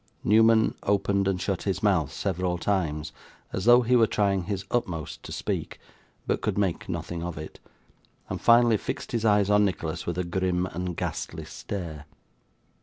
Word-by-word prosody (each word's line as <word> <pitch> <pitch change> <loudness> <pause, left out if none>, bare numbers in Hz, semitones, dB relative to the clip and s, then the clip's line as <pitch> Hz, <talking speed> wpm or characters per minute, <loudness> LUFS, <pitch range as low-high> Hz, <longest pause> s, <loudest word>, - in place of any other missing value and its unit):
Newman 110 +1 +5
opened 100 -1 +1
and 95 -2 0
shut 95 -1 -2
his 95 -1 -2
mouth, 90 -9 +2
several 90 0 -1
times, 80 -5 -1 0.4
as 95 - -2
though 120 +1 +7
he 125 +2 +3
were 115 -2 +5
trying 100 -3 +1
his 95 +1 -3
utmost 90 -11 -2
to - - -10
speak, - - -3 0.5
but - - -1
could - - -1
make 95 -4 -1
nothing 85 -1 -4
of 85 -2 -5
it, 75 +1 -8 0.7
and - - -5
finally 120 -1 +5
fixed - - -5
his 115 -2 -1
eyes 105 -2 +4
on 105 0 +5
Nicholas 85 -5 -2
with 85 0 -2
a 90 - 0
grim 90 0 0
and 90 -1 -4
ghastly - - -4
stare. 80 -7 -6
95 Hz, 170 wpm, -26 LUFS, 85-105 Hz, 0.7 s, though